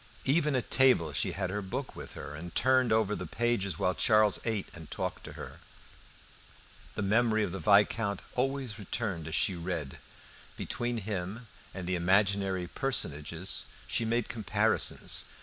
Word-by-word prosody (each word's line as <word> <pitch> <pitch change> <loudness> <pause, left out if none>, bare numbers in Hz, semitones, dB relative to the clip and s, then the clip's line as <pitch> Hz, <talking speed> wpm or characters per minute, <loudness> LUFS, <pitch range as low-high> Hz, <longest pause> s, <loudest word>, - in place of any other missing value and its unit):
Even 150 0 +3
at 125 - -2
table 125 - +4
she 70 - +1
had 95 -1 -2
her 105 +1 -2
book 115 +8 -4
by - - -7
her, - - -8
and 80 +3 -8
turned 130 -1 +4
over 110 -2 +2
the - - -5
pages 110 -7 0
while 90 - +1
Charles 110 0 +4
ate 110 -4 -1
and 80 -3 -9
talked - - -3
to - - -8
her. - - -9 1.4
The - - -2
memory 110 +2 +3
of 95 - -2
the 95 - -4
Viscount 100 +3 +3
always 130 -4 -1
returned 100 -5 -3
as 80 - -2
she 95 - +3
read. 85 -5 -4 0.6
Between 120 0 -2
him 100 +2 -4 0.3
and 95 -2 -6
the 90 - -1
imaginary 95 +1 +2
personages 85 - -2 0.2
she 115 - 0
made 115 0 0
comparisons. 110 -6 +1
105 Hz, 155 wpm, -30 LUFS, 90-120 Hz, 1.4 s, table